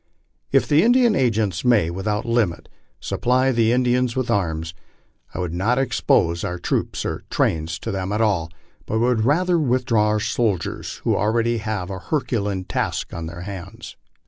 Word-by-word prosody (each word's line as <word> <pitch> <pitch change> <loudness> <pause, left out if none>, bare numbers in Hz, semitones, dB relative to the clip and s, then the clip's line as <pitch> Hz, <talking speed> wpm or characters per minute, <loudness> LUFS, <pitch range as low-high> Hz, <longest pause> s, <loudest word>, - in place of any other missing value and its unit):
If - - +3
the 150 +2 +4
Indian 240 +2 +4
agents 110 - +1
may, 110 -10 +3
without 105 +5 -2
limit, 115 -8 0 0.3
supply 130 +2 +1
the 115 -2 +2
Indians 125 0 +1
with 130 -2 -1
arms, 80 -4 -1 0.6
I - - -4
would 90 -2 -3
not 105 +8 +1
expose 85 -9 +1
our 90 - -3
troops 85 - -2
and - - -3
trains 80 0 0
to - - -5
them 95 0 -3
at 105 - -1
all, 100 -8 +1 0.4
but 110 - -1
would 120 -1 +2
withdraw 130 -7 +2
our 105 0 +1
soldiers, 105 -4 -1
who - - +2
already 115 +2 +1
have 105 -4 -3
a 95 - -5
herculean 105 -7 -2
task - - -3
on 85 -1 -5
their 85 +1 -8
hands. 95 -1 -8
110 Hz, 160 wpm, -22 LUFS, 90-125 Hz, 0.6 s, the